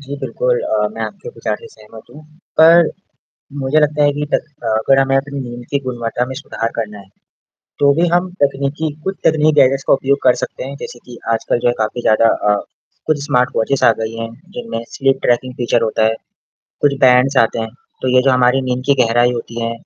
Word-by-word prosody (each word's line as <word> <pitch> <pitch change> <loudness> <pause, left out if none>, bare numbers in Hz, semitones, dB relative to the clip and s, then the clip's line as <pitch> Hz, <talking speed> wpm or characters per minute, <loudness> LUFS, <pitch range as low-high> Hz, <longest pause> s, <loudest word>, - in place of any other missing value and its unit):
जी, 140 0 -7
बिल्कुल - - -1
अ, - - 0
मैं - - -5
आपके 475 - -7
विचार 475 - -4
सहमत 115 - -15
हूँ, 150 - -13 0.4
पर, 165 +1 +7 0.7
मुझे 135 +3 +2
लगता 150 0 +1
है 145 - +3
कि 145 +1 -3
तक - - +1 0.2
अ, - - -5
अगर 135 +5 +3
हमें 135 0 +2
अपनी 140 +1 -2
नींद 120 -1 -7
की 140 - +1
गुणवत्ता 120 -1 -2
में 130 - -6
सुधार 115 -4 -4
करना 105 -2 -4
है, 100 -1 -15 0.7
तो 140 0 +5
भी 175 - +3
हम 175 +1 +2
तकनीकी 140 +3 -1
कुछ 190 0 -2
तकनीकी 155 -1 +4
गैजेट्स 135 +1 +2
का - - +5
उपयोग 140 +1 +1
कर 125 - +5
सकते - - -5
हैं। 135 +2 -7
जैसे 120 - -8
कि, 120 -1 -11 0.2
आजकल 115 +1 -1
जो 120 - 0
है 120 - +3
काफ़ी 110 +2 -2
ज़्यादा 110 0 +4 0.2
अ, - - +3 0.5
कुछ 145 -2 0
स्मार्टवॉचेज़ 125 0 0
आ - - +7
गई 110 0 -4
हैं, 115 0 -4 0.3
जिनमें 230 - -5
स्लीप 135 0 0
ट्रैकिंग 125 +1 +1
फीचर 120 -2 0
होता 110 0 0
है। 110 - +2 0.7
कुछ 145 -1 +3
बैंड्स 130 +2 +4
आते 115 - -3
हैं, 110 0 -3 0.3
तो 130 - 0
ये 125 - +5
जो 135 - +3
हमारी 125 +1 +3
नींद 125 0 -1
की 140 - +4
गहराई 120 +1 +2
होती 120 0 -6
है 115 0 -2
130 Hz, 210 wpm, -17 LUFS, 120-145 Hz, 0.7 s, पर